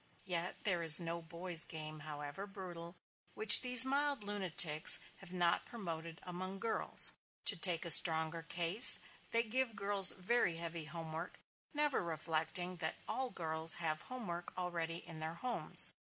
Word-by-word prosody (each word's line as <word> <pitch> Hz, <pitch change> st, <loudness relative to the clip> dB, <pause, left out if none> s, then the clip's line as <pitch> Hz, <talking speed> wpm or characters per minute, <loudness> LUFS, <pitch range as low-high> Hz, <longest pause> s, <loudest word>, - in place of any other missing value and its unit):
Yet 175 Hz, -1 st, -5 dB
there 180 Hz, -4 st, -4 dB
is 160 Hz, -1 st, +3 dB
no 170 Hz, 0 st, -7 dB
boy's 170 Hz, 0 st, -3 dB
game, 155 Hz, -1 st, -9 dB
however 150 Hz, +5 st, -10 dB
brutal, 175 Hz, -3 st, -12 dB, 0.4 s
which 215 Hz, -1 st, +9 dB
these 250 Hz, 0 st, +4 dB
mild 280 Hz, -2 st, -3 dB
lunatics 180 Hz, -6 st, +2 dB, 0.2 s
have 195 Hz, -2 st, -14 dB
not 175 Hz, -2 st, -2 dB
promoted 165 Hz, -6 st, -10 dB
among 185 Hz, +2 st, -10 dB
girls. 225 Hz, +3 st, +3 dB, 0.3 s
To 205 Hz, -, -1 dB
take 175 Hz, -1 st, 0 dB
a 170 Hz, -, +1 dB
stronger 160 Hz, +1 st, +4 dB
case, 170 Hz, +7 st, +5 dB, 0.3 s
they 230 Hz, 0 st, -1 dB
give 240 Hz, 0 st, -5 dB
girls 200 Hz, -1 st, +5 dB
very 185 Hz, -2 st, -3 dB
heavy 165 Hz, -1 st, -7 dB
home 160 Hz, 0 st, -11 dB
work; 165 Hz, +3 st, -9 dB, 0.3 s
never 295 Hz, -, -3 dB
reflecting 165 Hz, +2 st, -6 dB
that 160 Hz, -2 st, -5 dB
all 260 Hz, -1 st, -6 dB
girls 160 Hz, -4 st, 0 dB
have 155 Hz, -2 st, -5 dB
home 255 Hz, -2 st, -11 dB
work 175 Hz, -1 st, -9 dB
already 170 Hz, -2 st, -6 dB
in 165 Hz, -2 st, -11 dB
their 160 Hz, +1 st, -7 dB
homes. 245 Hz, +7 st, +3 dB
175 Hz, 155 wpm, -32 LUFS, 165-200 Hz, 0.4 s, which